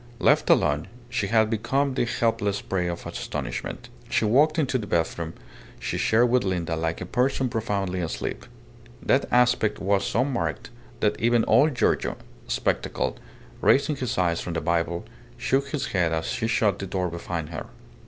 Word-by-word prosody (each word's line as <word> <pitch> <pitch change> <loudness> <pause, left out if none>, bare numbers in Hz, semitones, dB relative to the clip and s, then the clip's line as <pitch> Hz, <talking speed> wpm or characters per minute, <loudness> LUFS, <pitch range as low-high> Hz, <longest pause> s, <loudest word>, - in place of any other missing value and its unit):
Left - - +3
alone, 75 0 +3 0.2
she 110 -4 -1
had 110 +1 +3
become 135 +5 0
the 125 - +1
helpless 110 -4 0
prey 90 -2 -2
of 85 -1 -4
astonishment. 65 -5 -5 0.2
She - - +2
walked 150 +9 +4
into 135 -4 +1
the 105 - -6
bedroom 80 -1 -1 0.4
she - - -3
shared 115 +3 +4
with 125 0 +3
Linda 85 -3 -1
like 80 +1 -2
a - - -3
person 130 +5 +1
profoundly 100 -5 -2
asleep. 80 - -4 0.6
That - - +3
aspect 125 -3 +3
was 100 0 +1
so 125 - +1
marked 135 -4 -3 0.3
that - - +1
even 120 0 +3
old 135 +6 +4
Giorgio, - - +1 0.3
spectacled, - - -1 0.4
raising 145 +2 +4
his 125 -4 -3
eyes 85 -2 +1
from 90 - -4
the 80 - 0
Bible, 85 0 0 0.3
shook 135 +3 +1
his 140 -2 -2
head 85 -4 +2
as 80 0 -1
she 115 - -1
shut 110 -4 +2
the 95 - -4
door 90 -1 -1
behind 85 -2 -4
her. 80 - -6
105 Hz, 165 wpm, -25 LUFS, 85-125 Hz, 0.6 s, walked